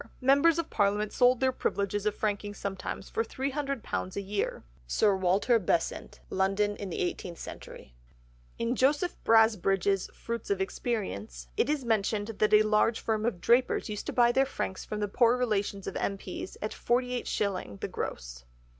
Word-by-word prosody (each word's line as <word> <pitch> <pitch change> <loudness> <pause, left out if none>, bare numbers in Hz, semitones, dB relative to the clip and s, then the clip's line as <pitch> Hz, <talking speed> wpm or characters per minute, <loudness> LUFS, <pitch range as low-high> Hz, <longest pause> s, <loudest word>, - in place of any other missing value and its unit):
"Members 280 +5 +4
of 335 - -3
Parliament 205 0 +1
sold 250 -1 +4
their 260 0 +3
privileges 205 -4 -1
of 210 - 0
franking 205 -1 -2
sometimes 195 -1 -5
for 225 - -1
£300 270 -6 -3
a 200 - -2
year." 200 +1 -2 0.2
(Sir 200 - +3
Walter 190 +6 +3
Besant, 170 -4 -1
London 195 +2 +1
in 200 - -5
the - - -4
Eighteenth 175 -1 -3
Century.) 65 - -10 0.6
In 230 +2 0
Joseph 290 +8 +2
Brasbridge's 200 -4 +3
Fruits 235 -1 -5
of 200 -1 +1
Experience, 145 - -3
it - - +1
is 295 -4 0
mentioned 215 -1 0
that 215 - +3
a 215 0 +7
large 215 +2 +2
firm 220 0 -1
of 195 -7 -2
drapers 240 +2 +2
used 210 -1 -5
to - - -3
buy 240 -1 +5
their 270 +2 +3
franks 190 -7 -4
from 210 0 -5
the 205 - +1
poor 235 +4 +3
relations 205 -5 -1
of - - -5
M.P.'s 195 -1 -4
at 215 - -2
forty 250 +1 0
eight 245 - -3
shilling 185 - -2
the - - -4
gross. - - -5
210 Hz, 170 wpm, -29 LUFS, 195-240 Hz, 0.6 s, a